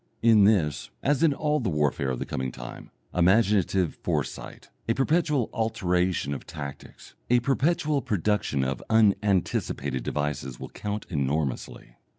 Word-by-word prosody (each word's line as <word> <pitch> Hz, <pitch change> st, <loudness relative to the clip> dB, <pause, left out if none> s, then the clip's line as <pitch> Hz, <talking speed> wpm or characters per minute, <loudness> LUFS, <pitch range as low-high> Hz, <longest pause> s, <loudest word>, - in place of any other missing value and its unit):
In 110 Hz, -3 st, +6 dB
this, 80 Hz, -9 st, +2 dB
as 140 Hz, 0 st, +2 dB
in 165 Hz, -2 st, +5 dB
all 150 Hz, +1 st, 0 dB
the -, -, -1 dB
warfare 75 Hz, -3 st, 0 dB
of 65 Hz, -, -2 dB
the -, -, -4 dB
coming 65 Hz, -1 st, -3 dB
time, -, -, -9 dB, 0.2 s
imaginative 95 Hz, -1 st, +2 dB
foresight, -, -, -4 dB, 0.2 s
a 115 Hz, -, +3 dB
perpetual 150 Hz, -3 st, +1 dB
alteration 90 Hz, -8 st, 0 dB
of 70 Hz, -, -7 dB
tactics, 75 Hz, -4 st, -9 dB, 0.2 s
a 125 Hz, 0 st, +5 dB
perpetual 145 Hz, +2 st, +1 dB
production 105 Hz, -, 0 dB
of 65 Hz, -1 st, -2 dB
unanticipated 100 Hz, -, +1 dB
devices, 70 Hz, -2 st, -3 dB
will -, -, -7 dB
count 105 Hz, 0 st, -5 dB
enormously. 70 Hz, -5 st, -2 dB
95 Hz, 135 wpm, -26 LUFS, 70-115 Hz, 0.2 s, In